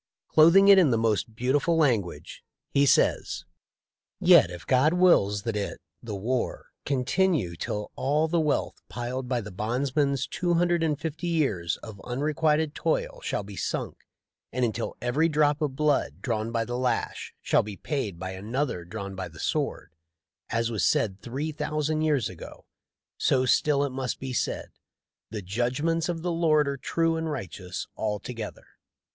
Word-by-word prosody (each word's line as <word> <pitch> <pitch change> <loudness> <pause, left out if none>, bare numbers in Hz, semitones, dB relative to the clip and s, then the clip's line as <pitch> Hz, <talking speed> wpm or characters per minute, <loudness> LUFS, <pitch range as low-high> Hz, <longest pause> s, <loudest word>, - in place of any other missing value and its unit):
Clothing 170 +6 +7
it 200 -1 +9
in 170 -6 +5
the 115 - +2
most 110 0 0
beautiful 145 +7 +1
language, 115 - 0 0.3
he 140 0 +3
says: - - +2 0.7
"Yet - - +7
if 90 -3 -9
God 130 - +3
wills 105 - +4
that 115 -2 -2
it 100 -1 -3 0.2
[the 110 -3 -5
war] 120 +6 -2 0.2
continue 135 - +1
till 105 +5 -4
all 150 +4 +1
the 170 +1 +1
wealth 150 -2 0
piled 125 +2 -4
by 125 -2 0
the 105 -1 -8
bondsman's 135 +6 0
two 175 -1 -1
hundred 175 0 +2
and 155 -3 0
fifty 160 +2 -4
years 135 - 0
of 110 -4 -9
un 125 +1 -4
requited 155 0 +1
toil 165 - -1
shall - - -2
be 100 0 -10
sunk, - - -3 0.6
and 125 0 +1
until 115 0 -3
every 145 +7 +2
drop 150 -1 +2
of 145 -3 -1
blood 140 - +1
drawn 110 +1 -1
by 115 -1 0
the 120 +2 -3
lash 125 -1 -2
shall - - +3
be 105 -2 -7
paid 130 - -3
by 95 +1 -5
another 105 +1 -2
drawn 100 +2 -6
by 95 -1 -5
the 80 -2 -14
sword, - - -2 0.6
as 115 0 0
was 110 - -1
said 95 -2 +1
three 140 +6 -3
thousand 150 +1 -1
years 150 -7 +2
ago, 90 -3 -11 0.5
so 130 -1 +3
still 140 +2 +3
it 140 - -1
must 130 -2 -3
be 130 -1 -5
said, - - -2 0.6
The 105 -2 -5
judgments 130 - 0
of 165 -2 -3
the 175 - 0
Lord 155 -3 +3
are 140 0 -2
true 165 +4 0
and 160 0 -2
righteous 95 - -5
altogether.' 110 +1 -4
130 Hz, 165 wpm, -27 LUFS, 110-155 Hz, 0.7 s, it